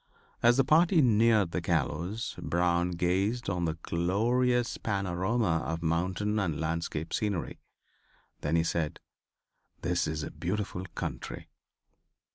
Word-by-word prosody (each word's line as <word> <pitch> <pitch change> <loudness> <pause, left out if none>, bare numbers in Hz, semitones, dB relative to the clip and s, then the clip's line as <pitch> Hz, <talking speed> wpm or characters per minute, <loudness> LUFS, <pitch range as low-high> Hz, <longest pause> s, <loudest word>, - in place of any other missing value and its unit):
As 120 +1 +5
the 135 - +5
party 165 +5 +4
neared 110 - +4
the - - -1
gallows 90 +10 -1
Brown 85 0 +1
gazed 95 +6 0
on 90 -2 -1
the 80 -1 -1
glorious 120 +8 +1
panorama 95 -1 0
of 80 0 -3
mountain 95 +6 0
and 85 -7 -1
landscape 80 0 -2
scenery. 100 -5 -2 0.8
Then 75 +3 0
he 80 - +3
said: 80 -2 -1 0.8
"This 90 +1 +1
is 75 -1 -3
a - - -5
beautiful 95 0 -3
country." - - -5
90 Hz, 120 wpm, -29 LUFS, 85-110 Hz, 0.8 s, As